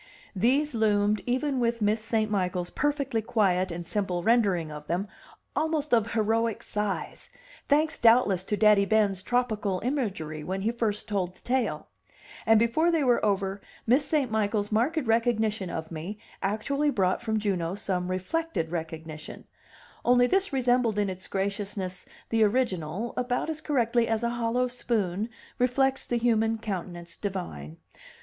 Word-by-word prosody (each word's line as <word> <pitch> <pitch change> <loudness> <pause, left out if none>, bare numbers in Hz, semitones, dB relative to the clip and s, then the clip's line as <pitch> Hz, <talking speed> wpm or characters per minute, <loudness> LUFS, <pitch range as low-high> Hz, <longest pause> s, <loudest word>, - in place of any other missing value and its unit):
These 265 +9 +2
loomed, 210 -2 +2
even 260 +2 0
with 235 -1 +1
Miss 215 +1 +1
St. 220 -1 0
Michael's 180 -3 -1
perfectly 280 -5 0
quiet 195 -6 +1
and 170 +1 -5
simple 180 -2 -2
rendering 195 -9 +2
of 150 0 -9
them, 180 +5 -1 0.5
almost 310 -3 0
of 230 -1 +3
heroic 225 0 +1
size, 210 -1 -3 0.4
thanks 310 +2 +2
doubtless 225 -6 +5
to 210 - -1
Daddy 210 -2 +5
Ben's 205 -3 +2
tropical 215 -4 0
imagery 195 - -2
when 190 +4 -3
he 225 - +1
first 225 -3 -2
told 185 -4 -2
the - - -18
tale; 255 -1 -1 0.6
and 225 0 +7
before 235 +10 +3
they 325 -3 +2
were 245 -2 +3
over 200 -1 0 0.2
Miss 255 +5 +4
St. 280 -4 0
Michael's 210 -1 0
marked 245 +10 +1
recognition 225 -4 +1
of 160 -1 -5
me 170 +6 -5 0.2
actually 270 +9 0
brought 185 -8 +1
from 220 0 -1
Juno 190 -4 -1
some 185 -3 -2
reflected 185 - -2
recognition 160 -2 -6 0.6
only 245 0 +5
this 385 +9 +1
resembled 245 -4 +2
in 205 -2 +1
its 185 0 -7
graciousness 195 -1 -3 0.2
the 225 -1 +1
original 210 -3 0
about 250 +5 -1
as 310 -1 -5
correctly 240 -4 +1
as 225 0 0
a 235 - +1
hollow 240 +1 0
spoon 220 -4 -1 0.3
reflects 265 +2 +2
the 240 - 0
human 225 -1 +2
countenance 180 -5 -5
divine. 85 - -5
215 Hz, 150 wpm, -27 LUFS, 190-245 Hz, 0.6 s, and